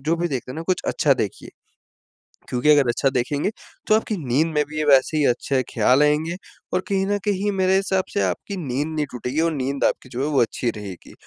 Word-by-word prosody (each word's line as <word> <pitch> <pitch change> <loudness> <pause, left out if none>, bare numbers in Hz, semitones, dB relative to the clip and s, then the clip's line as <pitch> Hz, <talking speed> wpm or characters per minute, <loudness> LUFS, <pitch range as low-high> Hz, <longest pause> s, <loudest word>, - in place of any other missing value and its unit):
जो 155 +4 0
भी 175 +1 -1
देखते 130 -4 -4
हैं 140 - -9
ना 165 - -4
कुछ 185 -1 0
अच्छा - - +2
देखिए, - - -4 1.0
क्योंकि 125 +4 +1
अगर 145 -4 +6
अच्छा 135 +3 +2
देखेंगे, 140 +7 -1 0.4
तो 215 - +5
आपकी 220 -2 -1
नींद 135 +7 +2
में 150 - +3
भी 155 - -7
ये 155 - 0
वैसे 140 +2 +4
ही 150 - +3
अच्छे 130 +2 +1
ख्याल 125 +5 +4
आएँगे 155 +3 +1 0.4
और 180 - +3
कहीं 195 -1 +1
न 205 0 +1
कहीं 205 0 0
मेरे 190 -1 +2
हिसाब 190 -1 +1
से 205 - +1
आपकी 200 - -3
नींद 145 -2 -2
नहीं 155 -2 -2
टूटेगी 125 +4 -3
और 165 0 +2
नींद 140 -1 -2
आपकी 130 - -1
जो 125 +2 -4
है - - 0
वो 140 - +3
अच्छी 120 +1 0
रहेगी। 100 -4 -9
150 Hz, 225 wpm, -22 LUFS, 130-185 Hz, 1.0 s, अगर